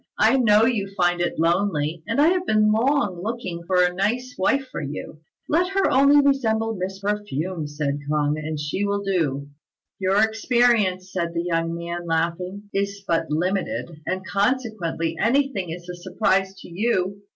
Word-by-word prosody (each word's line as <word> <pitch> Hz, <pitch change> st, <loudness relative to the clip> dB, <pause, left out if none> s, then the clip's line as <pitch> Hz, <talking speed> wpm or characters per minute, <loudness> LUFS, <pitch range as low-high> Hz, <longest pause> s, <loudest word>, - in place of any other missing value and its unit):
I 230 Hz, +5 st, +4 dB
know 220 Hz, -3 st, +5 dB
you 210 Hz, -5 st, 0 dB
find 175 Hz, -1 st, +2 dB
it 175 Hz, -, -1 dB
lonely, 165 Hz, -2 st, 0 dB
and 230 Hz, +5 st, -1 dB
I 305 Hz, +3 st, +6 dB
have 365 Hz, 0 st, 0 dB
long 215 Hz, +2 st, +2 dB
been 175 Hz, -, -9 dB
looking 205 Hz, -5 st, -4 dB
out 170 Hz, -, -15 dB
for 180 Hz, -1 st, +4 dB
a 180 Hz, 0 st, +1 dB
nice 240 Hz, +7 st, -1 dB
wife 270 Hz, +8 st, +1 dB
for -, -, -4 dB
you." 150 Hz, +1 st, -6 dB, 0.3 s
"Let 360 Hz, +5 st, +1 dB
her 390 Hz, 0 st, +2 dB
only 280 Hz, +2 st, +6 dB
resemble 225 Hz, -5 st, +1 dB
Miss 190 Hz, -1 st, -4 dB
Perfume," 185 Hz, -5 st, -3 dB
said 145 Hz, -1 st, -2 dB
K'ung, 150 Hz, -1 st, +1 dB
"and 155 Hz, 0 st, -4 dB
she 150 Hz, +7 st, -2 dB
will 200 Hz, 0 st, -1 dB
do." 145 Hz, -8 st, -1 dB, 0.5 s
"Your 195 Hz, +2 st, +3 dB
experience," 220 Hz, -4 st, +2 dB
said 170 Hz, -2 st, -2 dB
the 170 Hz, -, 0 dB
young 165 Hz, -1 st, -1 dB
man, 170 Hz, +1 st, -5 dB
laughing, 170 Hz, +4 st, -2 dB
"is 200 Hz, 0 st, -2 dB
but 165 Hz, -1 st, 0 dB
limited, 180 Hz, +3 st, -1 dB, 0.2 s
and, 185 Hz, 0 st, -2 dB
consequently, 200 Hz, -8 st, -1 dB
anything 235 Hz, -6 st, +1 dB
is 175 Hz, +2 st, -7 dB
a 180 Hz, -, -5 dB
surprise 190 Hz, +2 st, 0 dB
to -, -, -11 dB
you. 195 Hz, +1 st, -1 dB
190 Hz, 170 wpm, -23 LUFS, 170-220 Hz, 0.5 s, I